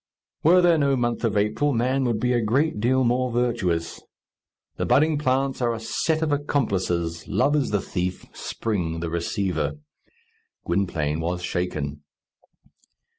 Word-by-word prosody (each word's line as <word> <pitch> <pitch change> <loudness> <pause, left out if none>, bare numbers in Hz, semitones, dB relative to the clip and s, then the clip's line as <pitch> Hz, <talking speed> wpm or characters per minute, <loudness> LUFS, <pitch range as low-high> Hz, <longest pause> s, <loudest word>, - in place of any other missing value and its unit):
Were 180 +3 +5
there 170 -2 +5
no 140 -1 +3
month 120 -1 -1
of 110 -3 +1
April, 110 +8 +1
man 130 +3 +1
would 115 -3 0
be 125 +2 +1
a 120 - +2
great 125 +4 +1
deal 130 +4 +2
more 125 +1 +1
virtuous. 115 -9 -1 0.8
The - - -1
budding 155 +1 +3
plants 135 -1 0
are 120 -1 +1
a - - -6
set 155 +8 -1
of 155 - 0
accomplices! 95 - -1
Love 105 +9 +2
is 145 -3 +1
the 105 -2 0
thief, 90 0 -3
Spring 85 -7 -3
the 85 -1 -3
receiver. 85 -2 -1 0.9
Gwynplaine 80 -5 0
was 90 +2 -2
shaken. 75 -5 -3
115 Hz, 145 wpm, -24 LUFS, 90-135 Hz, 0.9 s, Were